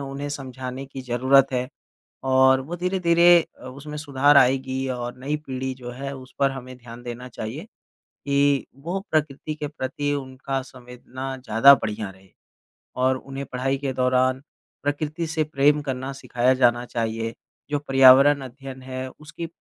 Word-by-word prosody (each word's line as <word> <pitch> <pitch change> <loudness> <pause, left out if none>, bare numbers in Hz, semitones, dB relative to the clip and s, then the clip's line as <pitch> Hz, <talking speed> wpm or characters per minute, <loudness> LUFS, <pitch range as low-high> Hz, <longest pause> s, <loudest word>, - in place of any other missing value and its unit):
उन्हें 140 +1 -5
समझाने 130 -1 -6
की 135 0 -8
ज़रूरत 130 +2 +4
है 125 0 -1 0.5
और 130 0 +4
वो 160 +7 -6
धीरे-धीरे 175 -1 +4 0.2
अ, - - -13
उसमें 145 +3 -8
सुधार 145 0 +3
आएगी 130 0 +3
और 120 -1 -4
नई 140 +4 -2
पीढ़ी 130 0 -3
जो 125 -1 -7
है 135 +2 -6
उस 130 0 -13
पर 140 -1 +3
हमें 130 -1 -8
ध्यान 120 0 -11
देना 120 +1 -7
चाहिए 120 - -6 0.4
कि 140 -1 0 0.2
वो 175 +5 -2
प्रकृति 155 0 -1
के 150 0 -5
प्रति 145 0 -3
उनका 135 0 -4
संवेदना 130 +1 -8
ज़्यादा 125 +4 +7
बढ़ियाँ 105 -5 -4
रहे। 95 0 -21 0.7
और 130 +1 +2
उन्हें 135 +1 -7
पढ़ाई 130 +2 0
के 135 -1 -3
दौरान 130 0 +2 0.4
प्रकृति 150 +3 -2
से 160 -1 0
प्रेम 150 0 +2
करना 135 -1 -4
सिखाया 125 -2 +1
जाना 120 -1 +3
चाहिए 115 -1 -3 0.4
जो 145 - +1
पर्यावरण 135 0 +6
अध्ययन 130 +1 -10
है 130 0 -5
उसकी 160 +2 -7
135 Hz, 155 wpm, -24 LUFS, 125-145 Hz, 0.7 s, ज़्यादा